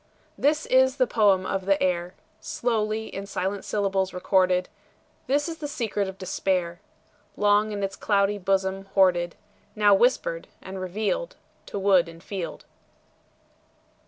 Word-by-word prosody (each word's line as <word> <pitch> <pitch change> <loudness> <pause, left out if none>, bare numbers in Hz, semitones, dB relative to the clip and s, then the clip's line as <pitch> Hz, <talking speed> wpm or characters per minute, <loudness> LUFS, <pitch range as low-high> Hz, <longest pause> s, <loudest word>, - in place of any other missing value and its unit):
This 300 +2 +1
is 260 0 +4
the 255 - +4
poem 200 -5 +3
of 190 0 -3
the 195 0 +3
air, 180 -1 -1 0.2
Slowly 220 -2 -1
in 200 -2 -7
silent 195 0 -3
syllables 195 -2 -1
recorded; 185 -1 +2 0.6
This 290 +3 +1
is 325 -1 -6
the 300 - -4
secret 215 -7 -2
of 190 0 -7
despair, 180 -2 -2 0.6
Long 210 +1 +3
in 205 -1 -3
its 195 - -2
cloudy 205 0 +1
bosom 195 0 0
hoarded, 175 -3 +3 0.4
Now 205 -1 +5
whispered 260 - +1
and 190 0 -8
revealed 215 - -2 0.3
To - - -5
wood 190 -3 +3
and 165 +1 -13
field. 190 -4 -6
195 Hz, 135 wpm, -25 LUFS, 185-215 Hz, 0.6 s, Now